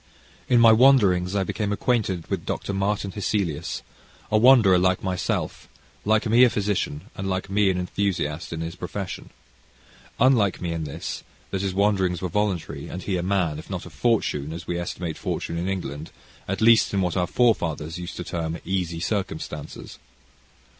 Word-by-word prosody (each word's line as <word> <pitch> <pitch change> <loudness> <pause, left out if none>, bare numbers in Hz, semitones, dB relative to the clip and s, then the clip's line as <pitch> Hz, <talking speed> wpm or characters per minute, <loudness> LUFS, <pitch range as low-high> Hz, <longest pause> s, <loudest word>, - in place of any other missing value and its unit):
In 120 - +5
my 115 -1 +8
wanderings 105 -7 +5
I 100 - +2
became 105 +2 -2
acquainted 105 -6 0
with - - -3
Dr. 100 - -3
Martin 100 0 -1
Hesselius, 90 -6 -2 0.5
a 110 - +4
wanderer 110 -7 +6
like 95 0 +1
myself, 95 -1 -2 0.4
like 110 +2 +3
me 115 +3 +5
a 125 - +7
physician, 100 -8 -2
and 95 0 -4
like 95 +1 -3
me 100 0 +3
an 95 - 0
enthusiast 90 -4 -2
in 80 -1 -4
his 85 +1 -5
profession. 95 +2 -6 0.9
Unlike 115 -6 +4
me 85 -2 -3
in 80 -1 -3
this, 75 +3 -5 0.3
that 95 - -1
his 95 -2 -2
wanderings 95 -3 +2
were 90 - -3
voluntary, 100 -2 -2
and 90 - -6
he 95 - -1
a 90 - 0
man, 90 -5 0
if - - -12
not 95 -3 -4
of 90 - -12
fortune, 80 - 0
as 85 0 -7
we 85 0 -2
estimate 85 -1 -4
fortune - - -3
in 90 +2 -2
England, 80 -5 -4 0.4
at 95 +1 -3
least 115 0 +5
in 95 - +2
what 90 -2 -1
our 90 -2 +1
forefathers 85 -8 +1
used 90 +1 -6
to - - -5
term 85 -1 -3
"easy 90 -3 -2
circumstances." 80 -6 -4
95 Hz, 175 wpm, -24 LUFS, 85-105 Hz, 0.9 s, my